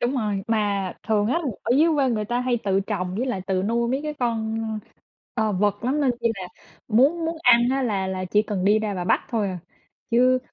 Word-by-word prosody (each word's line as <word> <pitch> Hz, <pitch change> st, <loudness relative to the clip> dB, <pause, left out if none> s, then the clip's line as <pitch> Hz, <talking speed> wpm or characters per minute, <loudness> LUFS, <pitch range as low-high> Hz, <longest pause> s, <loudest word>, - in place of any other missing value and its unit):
Đúng 245 Hz, +3 st, 0 dB
rồi, 210 Hz, -5 st, -1 dB
mà 205 Hz, -4 st, 0 dB, 0.2 s
thường 210 Hz, -2 st, +2 dB
á, 260 Hz, +9 st, +1 dB, 0.2 s
ở -, -, -3 dB
dưới 315 Hz, +4 st, +5 dB
quê 275 Hz, -3 st, +2 dB
người 215 Hz, -3 st, -1 dB
ta 240 Hz, +3 st, -1 dB
hay 250 Hz, -1 st, 0 dB
tự 195 Hz, -1 st, +2 dB
trồng 185 Hz, -3 st, -3 dB
với 240 Hz, +6 st, -1 dB
lại 245 Hz, -7 st, -2 dB
tự 190 Hz, -1 st, 0 dB
nuôi 235 Hz, +3 st, 0 dB
mấy 265 Hz, +3 st, 0 dB
cái 305 Hz, 0 st, -4 dB
con, 225 Hz, -4 st, -1 dB, 0.8 s
ờ, 220 Hz, -3 st, +1 dB
vật 205 Hz, +2 st, 0 dB
lắm, 270 Hz, +4 st, +1 dB
nên, 275 Hz, -3 st, +3 dB
kiểu 240 Hz, -, -5 dB
như 230 Hz, -, +3 dB
là, 180 Hz, -, -7 dB, 0.4 s
muốn 280 Hz, +9 st, +3 dB
muốn 330 Hz, 0 st, -2 dB
ăn 240 Hz, -3 st, +6 dB
á 270 Hz, +1 st, 0 dB
là 200 Hz, -6 st, -1 dB
là 185 Hz, 0 st, -3 dB
chỉ 205 Hz, +3 st, +2 dB
cần 205 Hz, -4 st, -3 dB
đi 205 Hz, +2 st, +4 dB
ra 215 Hz, -2 st, -2 dB
và 180 Hz, -2 st, -3 dB
bắt -, -, +3 dB
thôi 220 Hz, -5 st, 0 dB
à, 185 Hz, -1 st, -4 dB, 0.5 s
chứ 255 Hz, +2 st, +4 dB
220 Hz, 240 wpm, -24 LUFS, 200-250 Hz, 0.8 s, ăn